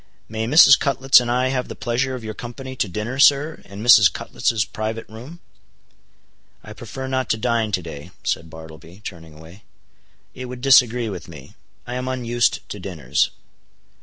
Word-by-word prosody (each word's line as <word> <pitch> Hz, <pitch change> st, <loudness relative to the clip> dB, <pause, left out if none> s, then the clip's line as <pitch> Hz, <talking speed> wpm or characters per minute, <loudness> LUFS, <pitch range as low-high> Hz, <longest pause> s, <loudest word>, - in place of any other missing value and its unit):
May 110 Hz, 0 st, -4 dB
Mrs. 140 Hz, 0 st, +7 dB
Cutlets 135 Hz, -1 st, +4 dB
and 120 Hz, -1 st, -4 dB
I 125 Hz, +2 st, +1 dB
have 130 Hz, -1 st, -2 dB
the -, -, -8 dB
pleasure 120 Hz, +4 st, -2 dB
of 125 Hz, -, -8 dB
your 110 Hz, 0 st, -5 dB
company 130 Hz, +4 st, -8 dB
to 110 Hz, -, -1 dB
dinner, 105 Hz, +8 st, -5 dB
sir, 145 Hz, +3 st, +4 dB
in 100 Hz, +2 st, -9 dB
Mrs. 105 Hz, -6 st, +7 dB
Cutlets' 110 Hz, -2 st, -1 dB
private 110 Hz, +2 st, -5 dB
room?" 125 Hz, +10 st, -12 dB, 1.2 s
"I 105 Hz, -, -10 dB
prefer 125 Hz, +4 st, -8 dB
not 130 Hz, -2 st, -2 dB
to 110 Hz, -, +1 dB
dine 115 Hz, -1 st, -1 dB
to 90 Hz, -2 st, -1 dB
day," 75 Hz, -3 st, -9 dB
said 80 Hz, 0 st, -2 dB
Bartleby, 80 Hz, +3 st, -13 dB
turning 80 Hz, -4 st, -9 dB
away. 80 Hz, +6 st, -15 dB, 0.7 s
"It 130 Hz, -, -8 dB
would 125 Hz, 0 st, -8 dB
disagree 125 Hz, -3 st, +4 dB
with 90 Hz, -4 st, -7 dB
me; 75 Hz, -5 st, -13 dB, 0.3 s
I 125 Hz, -, -6 dB
am 125 Hz, 0 st, -4 dB
unused 120 Hz, -2 st, -1 dB
to 105 Hz, -, -7 dB
dinners." 80 Hz, -7 st, -1 dB
115 Hz, 170 wpm, -21 LUFS, 95-130 Hz, 1.2 s, Mrs